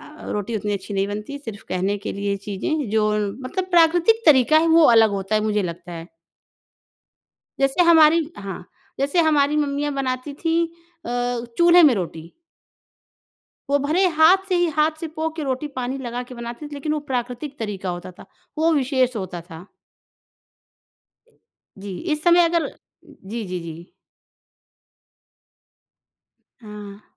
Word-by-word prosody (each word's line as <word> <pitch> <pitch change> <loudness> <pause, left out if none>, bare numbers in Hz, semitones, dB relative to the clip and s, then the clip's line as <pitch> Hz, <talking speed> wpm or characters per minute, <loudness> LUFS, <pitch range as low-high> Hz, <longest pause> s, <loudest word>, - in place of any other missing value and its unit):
अ, 305 +1 -11
रोटी 210 +2 -3
उतनी 210 0 -3
अच्छी 200 +1 -5
नहीं 195 0 +1
बनती 210 +7 -6
सिर्फ़ 225 -8 -9
कहने 190 +2 -1
के 205 - -5
लिए 200 0 -2
चीज़ें 240 +8 -2
जो 215 -1 +2 0.3
मतलब 370 +9 -4
प्राकृतिक 350 +6 +4
तरीक़ा 295 +1 +6
है 325 - +2
वो 325 0 +6
अलग 220 -1 +6
होता 195 +1 -3
है 215 - +3
मुझे 210 -1 0
लगता 175 0 -6
है। 165 +1 -8 1.5
जैसे 275 +6 +3
हमारी 325 -1 +5
हाँ, 195 -3 -7 0.4
जैसे 280 +5 +2
हमारी 290 -1 +2
मम्मियाँ 290 0 -1
बनाती 260 +1 -3
थीं 330 +1 +2 0.4
अ, 245 0 -2
चूल्हे 345 +1 +7
में 285 -6 +6
रोटी। 165 -3 -6 1.4
वो 285 - +3
भले 315 +7 +1
हाथ 370 +5 +6
से 370 - +1
ही 350 - +2
हाथ 305 +1 +3
से 330 - -3
पो 320 0 -1
के 315 - -4
रोटी 265 +2 -2
पानी 255 +2 -3
लगा 245 -1 -5
के - - -8
बनाते 235 +4 -7
थे। 295 - -9
लेकिन 290 +2 -3
वो 305 - -1
प्राकृतिक 250 +4 -4
तरीक़ा 200 -5 -4
होता 175 +1 -7
था, 180 - -15 0.3
वो 325 +1 +3
विशेष 260 -3 +1
होता 185 -4 -5
था। 165 +3 -10 2.1
जी, 195 -1 -7 0.2
इस 300 0 -2
समय 345 0 +6
अगर 335 -1 0 0.4
जी, 220 +4 -8
जी, 180 -2 -5
जी। 170 +1 -10 2.7
हाँ। 210 -1 -10
255 Hz, 150 wpm, -22 LUFS, 205-310 Hz, 2.7 s, चूल्हे